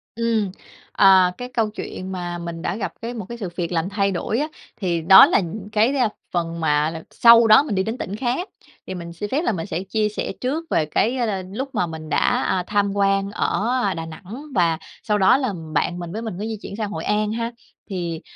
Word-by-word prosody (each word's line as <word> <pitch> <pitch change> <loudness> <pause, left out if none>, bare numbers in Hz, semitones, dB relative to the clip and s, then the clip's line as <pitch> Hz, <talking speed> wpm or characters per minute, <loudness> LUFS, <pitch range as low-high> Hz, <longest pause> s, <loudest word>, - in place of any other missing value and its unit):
Ừm, 225 -4 0 0.4
ờ, 190 -2 +6
cái 250 0 -6
câu 225 -2 +1
chuyện 190 -3 -7
mà 175 -1 -4
mình 170 -1 -6
đã 185 - -2
gặp 215 - -4
cái 235 +1 -4
một 220 -5 -6
cái 235 - -6
sự 195 -6 -4
việc 175 -1 -3
làm 170 +2 0
thay 200 -1 +1
đổi 215 +6 -1
á 300 - 0 0.3
thì 175 -5 -1
đó 190 +7 +9
là 305 - +3
những 195 +3 -6
cái, 225 +6 +3
a, 250 -5 +2 0.2
phần 170 -1 -2
mà 150 -1 +2
là 165 -1 -7
sau 235 -1 +7
đó 215 +5 +7
mình 285 -9 -3
đi 190 - +1
đến 225 +4 -3
tỉnh 200 -4 -4
khác 260 - -2 0.4
thì 185 - -4
mình 170 -1 -7
xin 205 +5 -5
phép 285 - 0
là 285 - +1
mình 165 -5 -3
sẽ 175 +4 -3
chia 210 +2 0
sẻ 210 - -4
trước 285 +6 -1
về 155 - +2
cái, 225 - +1
a, 240 - +1
a, 195 -4 -2
lúc 265 +3 -5
mà 180 -5 +1
mình 160 -1 -8
đã, - - +2
à, 185 - 0
tham 205 -1 +1
quan 195 0 +1
ở, 215 +2 0
a, 195 -2 +1
Đà 165 0 -5
Nẵng 190 - -9
và 165 -3 +3 0.3
sau 210 -1 +1
đó 190 +6 +5
là 255 -7 -1 0.2
bạn 175 +3 0
mình 170 -1 -6
với 220 +3 -4
mình 225 -4 -4
có 215 - -3
di 220 -1 -4
chuyển - - -7
sang 210 -1 -3
Hội - - -4
An 210 0 0
ha. 230 +1 -2 0.4
Thì, 170 -4 -3
200 Hz, 245 wpm, -22 LUFS, 175-225 Hz, 0.4 s, đó